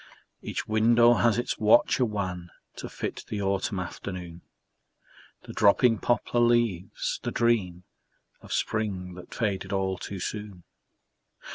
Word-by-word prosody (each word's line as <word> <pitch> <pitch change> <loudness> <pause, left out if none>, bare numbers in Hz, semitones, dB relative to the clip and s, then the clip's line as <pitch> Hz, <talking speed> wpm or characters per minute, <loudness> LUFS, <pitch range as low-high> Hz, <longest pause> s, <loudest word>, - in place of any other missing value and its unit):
Each - - -4
window 115 +2 +5
has 120 -2 +2
its 120 - -2
watcher 115 +4 +4
wan 90 -5 -4 0.3
To - - -6
fit - - -5
the 105 - -4
autumn 100 0 -1
afternoon, 90 -1 -7 1.0
The - - -10
dropping 115 +2 +4
poplar 120 0 0
leaves, 120 -6 +1
the - - -3
dream 100 -7 0 0.6
Of - - -13
spring 95 -4 -2
that 90 0 -12
faded 100 -5 -2
all 95 -2 -1
too 100 +1 -6
soon. 105 -2 -6
100 Hz, 125 wpm, -27 LUFS, 90-115 Hz, 1.0 s, window